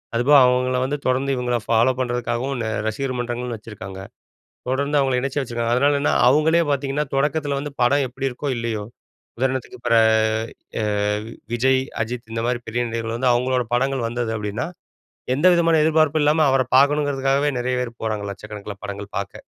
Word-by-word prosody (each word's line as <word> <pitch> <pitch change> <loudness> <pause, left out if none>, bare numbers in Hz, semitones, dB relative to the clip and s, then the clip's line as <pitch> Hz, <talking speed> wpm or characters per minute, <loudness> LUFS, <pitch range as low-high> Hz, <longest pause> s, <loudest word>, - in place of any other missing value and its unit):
அதுபோக 140 +5 +5
அவங்கள 125 0 +2
வந்து, 145 +2 -2
தொடர்ந்து 130 +2 +1
இவங்கள 125 -1 -1
ஃபாலோ 115 +3 +3
பண்ணுறதுக்காகவும் 125 +1 -2
ந 110 - -2 0.2
ரசிகர் 130 +4 -2
மன்றங்கள்னு 120 -1 -3
வச்சுருக்காங்க. 100 -3 -9 0.7
தொடர்ந்து 140 +3 0
அவங்களை 135 -2 +1
இணைச்சு 140 +2 -2
வச்சிருக்காங்க. 120 -2 -1
அதனாலென்னனா 140 +2 +2 0.2
அவுங்களே 160 +5 +4
பாத்தீங்கன்னா, 140 +1 0
தொடக்கத்துல 145 0 0
வந்து 145 0 -6
படம் 140 +3 +3
எப்படி 130 +2 -3
இருக்கோ 140 +4 -5
இல்லையோ 115 -3 -3 0.5
உதாரணத்துக்கு 130 -1 -2
பிற - - +3 0.9
அ - - 0 0.7
விஜய், 130 +2 +2 0.2
அஜித் 115 0 -6
இந்த 115 0 -2
மாரி 120 0 -1
பெரிய 120 +2 -1
நடிகர்கள் 115 0 -3
வந்து, 125 -1 +3
அவங்களோட 125 +1 +1
படங்கள் 135 -1 0
வந்தது 120 -1 -2
அப்படின்னா, 105 +4 -3 0.7
எந்த 150 - +2
விதமான 165 -2 +3
எதிர்ப்பார்ப்பும் 155 -1 +3
இல்லாம, 155 +1 +4
அவரை 130 -2 +2
பாக்கணும்ங்கிறதுக்காகவே, 140 0 +2
நிறைய 125 +1 -1
பேர் 115 -1 -7
போறாங்க, 110 -2 -2
1,00,000க்கணக்குல 105 0 -8
படங்கள் 100 0 -7
பார்க்க. 100 - -6
125 Hz, 155 wpm, -22 LUFS, 115-140 Hz, 0.9 s, அதுபோக